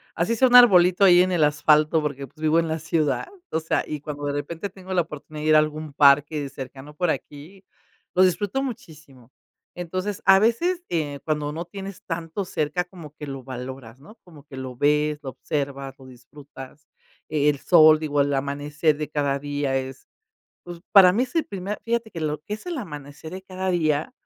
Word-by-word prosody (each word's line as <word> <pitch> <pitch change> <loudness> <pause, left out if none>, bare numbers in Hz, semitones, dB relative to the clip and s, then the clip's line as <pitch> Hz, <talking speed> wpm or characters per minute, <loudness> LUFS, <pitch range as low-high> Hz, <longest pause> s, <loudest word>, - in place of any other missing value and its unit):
así 195 +8 0
sea 260 +3 +4
un 250 - +3
arbolito 185 -6 +7
ahí 175 -2 +7
en 185 0 +1
el 170 -3 +2
asfalto, 150 +2 +3
porque, 140 -2 -4
pues, 150 +4 -20
vivo 155 +1 +2
en 165 - 0
la 160 0 -2
ciudad. 155 -5 -1 0.2
O 160 - 0
sea, 165 - -1
y 150 - -5
cuando 145 -1 -6
de 145 - -1
repente 165 +7 -4
tengo 190 0 -12
la 180 - +3
oportunidad 150 -1 -8
de 155 - 0
ir 155 - +6
a - - +8
algún 155 -1 -3
parque 145 0 +3
cercano 135 +2 -10
por 175 -1 +1
aquí, 165 +7 -8 0.5
lo 185 - +5
disfruto 205 +7 0
muchísimo. 155 - -10 0.4
Entonces 185 +3 -4
a 195 0 +7
veces, 340 - +1
eh, 145 -4 -2
cuando 150 -1 -2
no 165 +2 -4
tienes 195 +1 -9
tanto 165 +3 -4
cerca, 160 -1 -2
como 175 -5 -13
que 150 - -9
lo 135 -1 -6
valoras, 130 -1 -8
¿no? 210 +10 -15
Como 160 -5 -15
que 135 -2 -11
lo 130 -1 -6
ves, 150 +2 +1
lo 135 - -5
observas, 140 -1 -4
lo 130 - -15
disfrutas. 135 +2 -13 0.4
El 150 -2 +1
sol, 155 -3 +6
digo, 145 -2 -2
el 140 0 +2
amanecer 145 +2 -1
de 150 0 -4
cada 140 -2 -1
día 145 -1 -2
es, 130 0 -7 0.6
pues, 175 -1 -9
para 185 -3 +8
mí 230 - +1
es 255 - -9
el 325 - +1
primer 200 +1 -5
fíjate 230 -1 -2
que 165 - -8
lo 150 -1 -2
que 210 +6 -5
es - - -15
el 350 -4 -4
amanecer 150 - -9
de 185 0 -8
cada 190 0 -4
día, 155 -4 0
155 Hz, 200 wpm, -24 LUFS, 145-180 Hz, 0.6 s, a